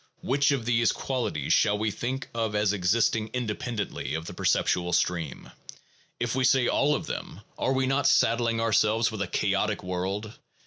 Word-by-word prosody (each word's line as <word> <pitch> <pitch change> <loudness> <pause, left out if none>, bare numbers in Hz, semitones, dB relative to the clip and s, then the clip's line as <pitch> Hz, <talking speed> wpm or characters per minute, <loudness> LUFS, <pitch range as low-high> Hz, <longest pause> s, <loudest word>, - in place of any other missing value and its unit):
Which 140 +1 +2
of 135 -5 0
these 115 -1 +3
qualities 115 - -2
shall 105 0 +3
we 110 0 -1
think 130 +6 -4
of 110 -2 -2
as 105 0 +2
existing 110 +3 +1
independently 115 -6 -3
of 80 0 -4
the - - -7
perceptual 90 -1 +1
stream? 85 -4 -1 0.7
If 120 -1 -1
we 130 0 0
say 125 0 +4
all 150 +2 +2
of - - -4
them, - - -6
are 130 - 0
we 130 0 +1
not 135 +1 +1
saddling 115 0 +2
ourselves 110 0 +2
with 110 -2 -5
a 100 - -1
chaotic - - 0
world? 95 +4 -4
115 Hz, 170 wpm, -27 LUFS, 100-125 Hz, 0.7 s, say